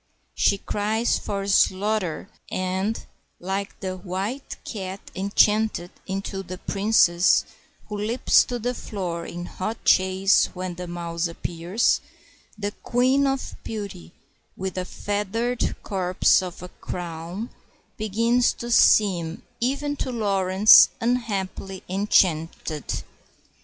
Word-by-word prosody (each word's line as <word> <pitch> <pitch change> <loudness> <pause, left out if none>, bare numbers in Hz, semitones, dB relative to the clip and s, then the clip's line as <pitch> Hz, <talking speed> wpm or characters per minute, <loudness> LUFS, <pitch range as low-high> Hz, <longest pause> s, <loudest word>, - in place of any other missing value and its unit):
She 200 - +2
cries 215 +4 0
for 200 -1 -3
"slarter," 195 -2 +1 0.2
and, 190 +4 -2 0.3
like 195 +2 -4
the 185 -1 -3
white 195 +9 -4
cat 190 -3 -5 0.2
enchanted 200 -1 +2 0.2
into 195 0 -3
the 185 -1 -7
Princess, 195 -3 +3 0.4
who 210 - -5
leaps 230 +4 +3
to 245 - -3
the 245 +2 -2
floor 180 -8 -5
in 175 0 -6
hot 215 +6 -5
chase 190 +1 +4
when 185 0 -4
the 180 +1 -7
mouse 170 0 -3
appears, 170 +5 0 0.6
the 205 0 -2
Queen 260 +3 +2
of 270 -1 -2
Beauty, 200 -6 -6 0.5
with 190 0 -4
a 180 - -3
feathered 210 +6 -2
corpse 185 -3 +3
for 180 -1 -6
a - - -10
crown, 175 +6 -6 0.4
begins 230 +3 +2
to 240 0 -6
seem 180 -7 +4 0.2
even 280 +4 -1
to 260 - -3
Laurence 200 -3 +6
unhappily 200 -5 -2
enchanted. 165 -6 0
195 Hz, 110 wpm, -24 LUFS, 180-220 Hz, 0.6 s, Laurence